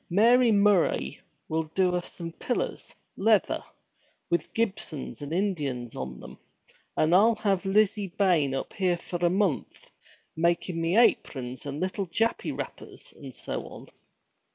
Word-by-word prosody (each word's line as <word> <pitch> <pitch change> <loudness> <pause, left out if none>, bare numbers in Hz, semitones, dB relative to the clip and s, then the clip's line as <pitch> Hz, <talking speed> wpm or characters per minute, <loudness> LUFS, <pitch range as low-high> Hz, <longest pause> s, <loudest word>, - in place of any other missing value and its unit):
Mary 235 +6 +5
Murray 200 - +2 0.3
will 160 0 -1
do 185 -2 +3
us 175 - -3
some 170 -2 -7
pillers 245 - -3 0.2
leather - - +2 0.7
with 170 -3 0
Gibsons 190 -11 -2
and 145 +1 -6
Indians 150 - -2
on 65 -1 -6
them. - - -11 0.6
And 155 +2 +3
I'll 220 +5 +6
have 195 -3 0
Lizzie 205 -1 +2
Bayne 165 -9 +3
up 135 - -4
here 185 -3 +1
for 175 0 -5
a 175 - +5
month, 185 -5 -1 0.4
makin' 170 +1 0
me 165 +5 +1
aprons 130 - +1
and 140 +1 -4
little 185 +2 -2
Jappy 225 +7 0
wrappers, - - -8
and - - -11
so - - -5
on.' - - -11
180 Hz, 140 wpm, -27 LUFS, 155-200 Hz, 0.7 s, I'll